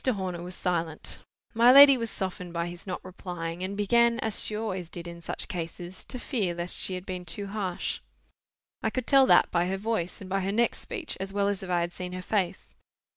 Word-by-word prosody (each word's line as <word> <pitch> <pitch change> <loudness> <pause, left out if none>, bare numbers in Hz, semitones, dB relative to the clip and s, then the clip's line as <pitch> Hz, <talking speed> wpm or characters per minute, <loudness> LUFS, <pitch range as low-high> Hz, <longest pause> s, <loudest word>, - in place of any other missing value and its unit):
Horner 190 -8 -1
was 180 +1 -6
silent. 170 -3 -2 0.3
My 235 +2 +7
lady 275 +1 +10
was 230 -2 -2
softened 185 -3 -4
by 170 0 -1
his 175 +2 -8
not 185 - -5
replying, 175 -2 -6
and 195 +2 -3
began 235 +3 +3
as 220 -2 0
she 215 - 0
always 190 -6 -3
did 170 0 -5
in 170 0 -9
such - - -4
cases, 175 +1 -5
to - - -7
fear 215 - -1
lest 175 +1 -1
she 185 - +1
had 180 0 -7
been 185 -2 -5
too 200 +4 -3
harsh. 195 -3 -3 0.8
I - - +1
could 255 -2 -3
tell 270 -2 +6
that - - +5
by 175 0 +2
her 190 +1 -1
voice 200 -4 -2
and 195 - -9
by 195 +1 0
her 195 +1 -1
next 235 +3 +1
speech, 385 -10 -3
as 195 +1 -4
well 200 0 +1
as 200 0 -1
if 190 - -7
I 175 -1 +2
had 170 0 -2
seen 180 0 -6
her 185 0 -5
face. 190 -3 -1
185 Hz, 225 wpm, -28 LUFS, 175-215 Hz, 0.8 s, lady